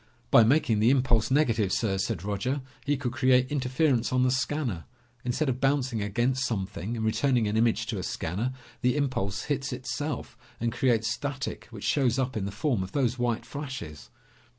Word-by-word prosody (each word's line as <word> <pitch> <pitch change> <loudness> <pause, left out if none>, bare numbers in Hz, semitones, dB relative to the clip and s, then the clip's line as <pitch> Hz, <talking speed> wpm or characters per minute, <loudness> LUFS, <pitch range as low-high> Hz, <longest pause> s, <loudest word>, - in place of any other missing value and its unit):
"By 115 - +8
making 115 -3 +3
the 110 +3 +5
impulse 125 -4 +3
negative, 115 -8 +2
sir," 95 -3 0
said 95 -3 -2
Roger, 115 +7 -2 0.2
"he 145 0 +2
could 130 -4 -2
create 130 0 +3
interference 130 -2 +1
on 130 0 +3
the 130 - +3
scanner. 130 - -1 0.4
Instead 125 +5 0
of 130 -1 -1
bouncing 135 -4 +1
against 120 +6 0
something 100 +1 -3
and 110 - -2
returning 120 0 +2
an 105 - -1
image 115 0 +2
to 110 -3 -3
a - - -4
scanner, 100 +12 -2 0.3
the 125 +1 +2
impulse 120 -8 -1
hits 140 -1 -2
itself 130 +4 -4 0.2
and 115 0 0
creates 115 -2 +1
static 140 +2 -4
which 110 -4 -9
shows 120 +3 +2
up 130 -1 -1
in 105 -3 -1
the 100 - -3
form 115 +1 0
of 95 0 -6
those 130 -3 +1
white 120 -2 0
flashes." 135 - -7
120 Hz, 180 wpm, -28 LUFS, 110-135 Hz, 0.4 s, By